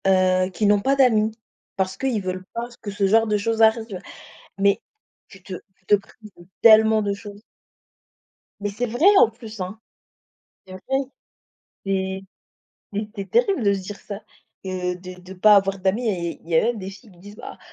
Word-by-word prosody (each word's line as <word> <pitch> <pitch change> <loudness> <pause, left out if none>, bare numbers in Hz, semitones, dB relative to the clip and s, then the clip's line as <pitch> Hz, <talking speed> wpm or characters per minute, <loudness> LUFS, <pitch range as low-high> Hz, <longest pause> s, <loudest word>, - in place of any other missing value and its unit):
Heu, 185 -1 +3
qui 210 +4 -1
n'ont 205 0 +4
pas 270 +5 +2
d'amis, 225 -5 +3 0.4
parce 190 -1 -2
qu'ils 255 -6 -1
veulent 185 0 -4
pas 235 +1 -3
que 215 - -6
ce 200 0 0
genre 225 +3 +4
de 210 -1 +1
choses 225 +2 -1
arrive. 220 -3 +2 0.6
Mais 200 0 +3 0.5
tu 195 -3 -16
te 190 - -8 0.2
tu 185 - -37
te 205 - +6
prives 210 +2 -12
de 175 - -15 0.2
tellement 220 -1 +7
de 200 -1 -1
choses. 205 0 -10 1.2
Mais 205 0 -2
c'est 210 +5 -2
vrai 240 +9 0
en 225 - +6
plus, 225 -2 -11
hein! 185 +4 -6 0.9
C'est 185 - -12
vrai. 185 - -9 1.1
C'est 190 0 -1 0.7
c'est 210 +1 -3
c'est 200 -2 -6
terrible 405 - +2
de 200 -2 +3
se 195 - -3
dire 200 +2 -7
ça, 200 -1 -7 0.4
que 180 -1 -2
de 180 0 -10
de 185 +1 -11
pas 210 +3 +6
avoir 195 0 +2
d'amis 195 +6 0
et 170 -4 -3
il - - -19
y 165 - +2
a - - +5
même 235 0 0
des 190 -1 -6
filles 200 +3 -15
qui 175 - -21
disent: 205 +3 -13
«Bah, - - -10
200 Hz, 195 wpm, -23 LUFS, 190-220 Hz, 1.2 s, tellement